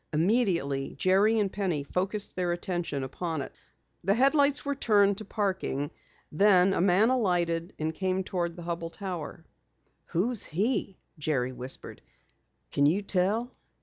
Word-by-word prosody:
Immediately, 170 - +1
Jerry 200 +4 +3
and 205 -3 +1
Penny 180 -8 -1
focused 195 +7 -2
their 180 -1 0
attention 175 -5 -2
upon 160 +3 -3
it. - - -10 0.5
The 195 +3 +2
headlights 280 +3 +3
were 285 - 0
turned 205 -6 +3
to 215 - -7
parking, 185 -9 -2 0.4
then 190 +2 +5
a - - +1
man 195 +6 +4
alighted 175 -7 0
and 155 +1 -2
came 190 +2 -1
toward 175 -2 -2
the 175 - -9
Hubell 170 -1 -3
Tower. 180 -6 -6 0.6
"Who 190 +9 0
is 235 - -2
he?" 200 - -1 0.2
Jerry 135 -5 0
whispered. 130 +1 -5 0.7
"Can 140 0 +3
you 190 +7 +1
tell?" 205 +6 0
185 Hz, 145 wpm, -28 LUFS, 165-205 Hz, 0.7 s, then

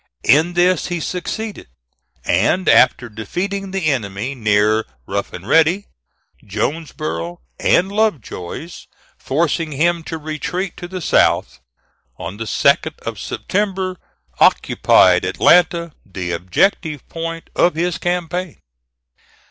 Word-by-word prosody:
In 155 +8 +4
this 175 0 +2
he 175 -1 -2
succeeded, 200 +6 -5 0.6
and 115 - +2
after 125 -1 +5
defeating 185 - -4
the 190 -2 -3
enemy 115 -3 -1
near 110 -2 +2 0.2
Rough 100 +5 -3
and 90 +3 -9
Ready, 165 +7 +3 0.6
Jonesboro, 85 - -4 0.2
and 190 +3 +3
Lovejoy's, 170 - -3 0.3
forcing 155 +2 -1
him 170 +4 +1
to 160 - -4
retreat 160 +4 -4
to 175 - -7
the 185 0 -6
south, 145 - +2 0.6
on 95 +4 -6
the 115 - -4
2d - - +2
of - - -4
September 190 -2 -2 0.4
occupied 90 -1 +4
Atlanta, 170 - +3
the 90 -3 -5
objective 145 - 0
point 165 0 -6
of 175 - +3
his 175 +1 -1
campaign. 175 0 -2
160 Hz, 110 wpm, -19 LUFS, 110-180 Hz, 0.6 s, after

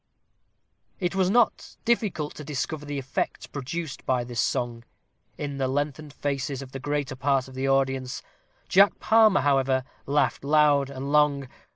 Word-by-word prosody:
It 180 -2 -1
was 190 -1 +2
not 235 +2 +1
difficult 200 -10 0
to 150 - -9
discover 145 +1 -4
the 145 0 -3
effect 135 -1 -3
produced 145 +2 -5
by 125 -2 +1
this 120 -1 -5
song, 120 0 -1 0.5
in 145 -2 -4
the 135 - +1
lengthened 145 +2 -2
faces 140 -1 -3
of 130 - -12
the 135 - -6
greater 145 -1 -2
part 135 0 +1
of 130 - -12
the 135 +1 -1
audience. 135 -1 0 0.4
Jack 195 +2 +5
Palmer, 220 -2 +5
however, 135 -2 +2 0.2
laughed 145 0 +1
loud 145 -1 +4
and 140 +1 -5
long. 145 -2 +3
140 Hz, 155 wpm, -26 LUFS, 135-150 Hz, 0.5 s, Jack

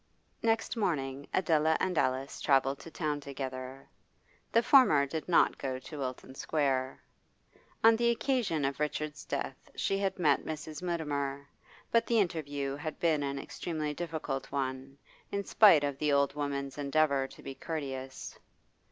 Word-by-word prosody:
Next 225 +1 +1
morning 140 - -1
Adela 160 -3 +3
and 185 -1 0
Alice 130 -1 0
travelled 135 0 +2
to - - -10
town 150 -3 -2
together. 135 -1 -6 0.6
The 230 - +4
former 230 - +6
did 160 +4 -5
not 175 - +4
go 130 -1 -2
to 145 +3 -9
Wilton 130 0 -5
Square. 135 -2 -1 0.8
On 225 0 +8
the 235 +1 +2
occasion 235 - 0
of 135 +1 -2
Richard's 150 0 -2
death - - -4
she 195 - 0
had 195 -1 -1
met 150 -6 +3
Mrs. 155 0 -6
Mutimer, 145 -5 -2 0.4
but 230 0 +3
the 235 - +2
interview 145 -8 -1
had 155 +1 -5
been 160 -3 +2
an 140 -1 -2
extremely 155 +1 -4
difficult 160 -4 -4
one, 135 0 -3 0.3
in 200 0 -1
spite 195 -8 +6
of 140 -1 -2
the 150 -1 +1
old 140 -1 +3
woman's 140 -1 -3
endeavour 140 -1 +2
to - - -15
be 135 - -6
courteous. 135 -4 -6
145 Hz, 150 wpm, -31 LUFS, 135-165 Hz, 0.8 s, On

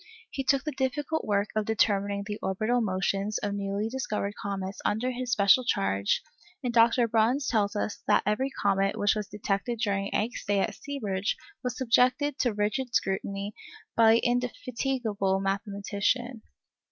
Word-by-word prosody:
He 270 - -3
took 270 0 +2
the 305 - -2
difficult 285 +4 -1
work 205 0 +1
of 215 -1 +1
determining 200 -2 +1
the 210 0 -5
orbital 215 +6 0
motions 195 +1 0
of 205 -1 -2
newly 200 +1 -2
discovered 215 -5 -2
comets 195 -1 -4
under 240 +5 0
his 250 0 -4
special 205 +3 +5
charge, 100 - +1 0.4
and 245 -2 -1
Dr. 235 +1 +5
Bruhns 230 +5 +2
tells 210 -3 +1
us 210 0 -2
that - - +4
every 235 +6 +1
comet 195 -5 +1
which 205 - +3
was 210 -2 -3
detected 210 +3 -2
during 200 -3 -1
Encke's 225 +4 -1
stay 200 -1 +1
at - - -1
Seeberge 205 -9 -2 0.3
was 250 -1 -3
subjected 260 +3 +2
to 245 - +2
rigid 215 +5 -1
scrutiny 195 +1 -1 0.4
by 225 -1 +6
the 230 - +5
indefatigable 240 -4 -1
mathematician. 200 +4 -1
215 Hz, 155 wpm, -28 LUFS, 200-245 Hz, 0.4 s, by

